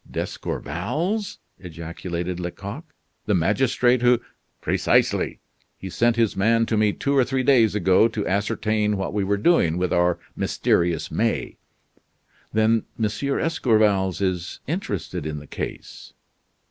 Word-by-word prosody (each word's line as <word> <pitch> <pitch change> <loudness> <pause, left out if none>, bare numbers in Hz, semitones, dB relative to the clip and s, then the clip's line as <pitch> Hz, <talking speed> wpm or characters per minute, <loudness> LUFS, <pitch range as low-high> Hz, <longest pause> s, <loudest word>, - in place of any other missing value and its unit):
"D'Escorval's," 165 - -3 0.2
ejaculated 85 +1 -5
Lecoq, 100 - -6 0.4
"the 105 - +3
magistrate 120 +7 +2
who 120 -1 +4 0.2
" - - -47
"Precisely. - - +1 0.4
He 95 - -8
sent 120 +4 +2
his 115 -3 +1
man 115 +3 +3
to 115 - -1
me 105 -1 +3
two 140 +6 -1
or 135 - +5
three 130 +1 -1
days 120 -5 +4
ago 95 +2 +4
to 105 -3 -4
ascertain 105 +1 0
what 95 - -3
we 105 -1 0
were 100 +1 +1
doing 100 - +3
with 90 0 0
our 90 0 +2 0.2
mysterious 85 -2 0
May." - - -1 0.9
"Then 110 +1 +2
M. - - 0
d'Escorval 110 -7 +1
is 95 -3 -2
interested 130 - -3
in 75 -1 -4
the 75 - -9
case?" - - -7
105 Hz, 135 wpm, -23 LUFS, 90-120 Hz, 0.9 s, or